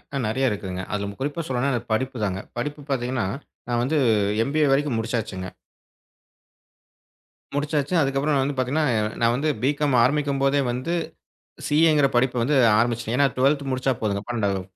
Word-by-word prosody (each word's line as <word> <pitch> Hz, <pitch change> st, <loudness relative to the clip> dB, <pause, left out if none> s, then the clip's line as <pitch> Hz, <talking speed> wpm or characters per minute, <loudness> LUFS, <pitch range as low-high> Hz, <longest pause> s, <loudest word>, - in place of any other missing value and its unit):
அ -, -, 0 dB
நெறைய 130 Hz, +4 st, +1 dB
இருக்குதுங்க. 95 Hz, -3 st, -4 dB
அதுல 100 Hz, 0 st, -3 dB
குறிப்பா 145 Hz, +4 st, -2 dB
சொல்லணும்னா 130 Hz, +2 st, 0 dB
அது 120 Hz, -, -2 dB
படிப்பு 130 Hz, +2 st, -1 dB
தாங்க. 95 Hz, -1 st, -2 dB, 0.2 s
படிப்பு 145 Hz, +4 st, -4 dB
பாத்தீங்கன்னா 125 Hz, -4 st, -1 dB, 0.4 s
நான் 120 Hz, 0 st, +1 dB
வந்து 150 Hz, +5 st, 0 dB, 0.5 s
எம்.பி.ஏ 150 Hz, +3 st, +1 dB
வரைக்கும் 140 Hz, -4 st, +1 dB
முடிச்சாச்சுங்க. 110 Hz, -5 st, -3 dB, 2.1 s
முடிச்சாச்சு. 145 Hz, +2 st, -1 dB
அதுக்கப்புறம் 140 Hz, +1 st, +1 dB
வந்து 140 Hz, 0 st, -2 dB
பாத்தீங்கன்னா 135 Hz, +5 st, +1 dB, 0.4 s
நான் 115 Hz, 0 st, +3 dB
வந்து 150 Hz, +4 st, 0 dB
பி.காம் 145 Hz, 0 st, +1 dB
ஆரம்பிக்கும் 140 Hz, +1 st, +1 dB
போதே 140 Hz, +1 st, +3 dB
வந்து 130 Hz, +8 st, -3 dB, 0.8 s
சி.ஏ.ங்கிற 150 Hz, -2 st, +4 dB
படிப்ப 120 Hz, -1 st, +2 dB, 0.3 s
ஆரம்பிச்சிட்டு 115 Hz, 0 st, 0 dB
ஏன்னா 140 Hz, +1 st, +4 dB
12th 140 Hz, +1 st, +2 dB
முடிச்சா 130 Hz, +1 st, 0 dB
போதுங்க. 100 Hz, -2 st, -1 dB
12 100 Hz, -5 st, -1 dB
130 Hz, 140 wpm, -24 LUFS, 115-145 Hz, 2.1 s, சி.ஏ.ங்கிற